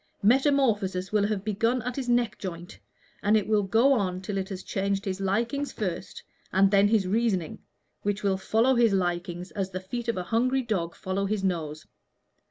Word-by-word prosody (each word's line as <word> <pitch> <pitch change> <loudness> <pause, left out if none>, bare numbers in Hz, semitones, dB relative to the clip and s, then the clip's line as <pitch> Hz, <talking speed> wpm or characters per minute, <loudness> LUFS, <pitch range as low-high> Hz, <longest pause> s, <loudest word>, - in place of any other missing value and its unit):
Metamorphosis 225 -7 +2
will 210 -1 +2
have 205 -2 -3
begun 230 +4 0
at 250 +1 -3
his 260 -3 -3
neck 240 -1 +1
joint, 175 -2 -7 0.4
and 210 +2 +4
it 210 - -1
will 215 -1 +3
go 225 +8 +4
on 185 -7 0
till 195 +2 -5
it 190 - -4
has 190 -1 -6
changed 195 0 -1
his 190 0 -3
likings 235 +9 -1
first 185 -4 -5 0.3
and 195 +1 +4
then 200 0 +5
his 210 -2 +2
reasoning, 195 -5 0 0.4
which 205 0 -2
will 195 -1 +2
follow 225 +6 +2
his 235 -4 +4
likings 175 -1 -2
as 195 -2 -3
the 185 0 -4
feet 235 +6 -5
of 230 - 0
a 180 - -2
hungry 255 +6 +1
dog 175 -8 -2
follow 195 +1 -2
his 205 -1 -1
nose. 155 -5 -2
200 Hz, 185 wpm, -27 LUFS, 185-230 Hz, 0.4 s, then